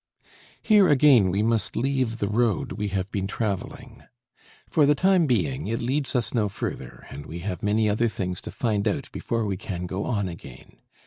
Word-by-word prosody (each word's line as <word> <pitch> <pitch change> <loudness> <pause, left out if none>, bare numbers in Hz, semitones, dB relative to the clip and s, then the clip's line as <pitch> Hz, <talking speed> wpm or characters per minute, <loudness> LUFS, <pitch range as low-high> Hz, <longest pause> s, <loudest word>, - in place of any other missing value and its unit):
Here 205 -5 +5
again 135 -8 +5
we 100 +3 0
must 110 -2 0
leave 130 -2 0
the 100 - -1
road 110 +1 0
we 105 -1 -3
have 95 -1 -3
been 95 -2 -2
traveling. 100 -2 -4 0.6
For 150 -3 +3
the 145 - +4
time 185 0 +3
being, 80 - 0
it 115 +2 -1
leads 135 +3 -1
us 120 -2 0
no 110 -4 +1
further 100 - -6
and 70 +1 -8
we 85 +2 -7
have 95 -4 -3
many 105 +1 +2
other 110 +3 +2
things 90 -4 -3
to - - -7
find 110 -4 -1
out 130 +5 -2
before 115 -2 -2
we 100 -2 -2
can 90 -1 -5
go 95 +3 -3
on 100 -6 -1
again. 85 -2 -11
110 Hz, 190 wpm, -25 LUFS, 95-125 Hz, 0.6 s, Here